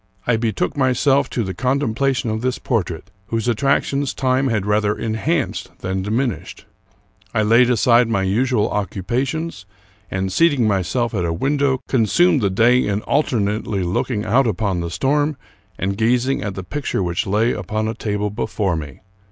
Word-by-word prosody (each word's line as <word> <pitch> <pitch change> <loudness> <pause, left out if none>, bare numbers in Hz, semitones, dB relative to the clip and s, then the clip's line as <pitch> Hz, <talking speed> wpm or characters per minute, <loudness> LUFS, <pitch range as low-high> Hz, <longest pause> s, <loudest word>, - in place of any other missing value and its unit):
I 120 - +2
betook 110 -2 -1
myself 135 +1 +2
to 120 - -1
the 95 -2 -4
contempla 135 +1 0
tion 120 -2 -2
of 110 0 -2
this 130 0 -1
portrait, 95 - -3 0.2
whose 115 0 -2
attractions 140 +3 +1
time 130 +1 +1
had 110 -6 0
rather 105 0 +1
enhanced 130 +8 -2
than 95 +1 -2
diminished. 115 +6 -3 0.7
I 110 - +3
laid 115 +3 +5
aside 120 0 +4
my 100 -4 +1
usual 110 +3 +1
occu 100 -2 -3
pations, 130 - -2 0.4
and, 95 0 -2
seating 145 -9 +3
myself 110 +5 0
at 95 -5 -1
a 85 - 0
window, 135 - 0
consumed 135 - +3
the 100 - +2
day 120 +6 +4
in 100 +1 -1
alternately 105 -7 0
looking 105 +5 -1
out 120 +5 +3
upon 100 -3 -1
the 85 0 -3
storm 145 - 0 0.4
and 100 +1 -1
gazing 120 +5 +1
at 100 -3 -4
the 95 - -5
picture 140 -1 -2
which 85 +1 -2
lay 110 +5 +2
upon 110 +4 -3
a 110 - -2
table 105 -2 -2
before 100 -4 -1
me. 75 -4 -7
115 Hz, 165 wpm, -20 LUFS, 100-130 Hz, 0.7 s, laid